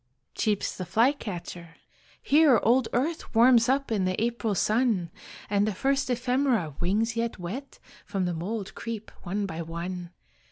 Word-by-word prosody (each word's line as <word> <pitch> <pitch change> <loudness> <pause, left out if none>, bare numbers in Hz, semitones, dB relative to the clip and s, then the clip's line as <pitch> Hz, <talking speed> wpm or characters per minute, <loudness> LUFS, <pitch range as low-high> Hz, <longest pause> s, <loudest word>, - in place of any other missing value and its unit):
Cheeps 210 -3 -1
the 185 - -4
flycatcher 185 - -1 0.5
"Here 285 -5 +5
old 235 +2 +3
earth 290 +2 -2
Warms 235 0 +6
up 275 -1 +1
in 200 -4 +1
the 185 0 -1
April 230 -2 -1
sun; 215 -5 +1 0.4
And 205 +1 +2
the 210 - -2
first 275 +4 0
ephemera, 245 - +1
wings 220 +6 0
yet 230 0 -2
wet, 210 +11 -6 0.3
From 195 -3 -1
the 175 - -1
mould 195 +5 -4
creep 225 -2 -6
one 200 +3 -2
by 165 -3 -5
one. 170 +2 -5
220 Hz, 150 wpm, -27 LUFS, 185-245 Hz, 0.5 s, Warms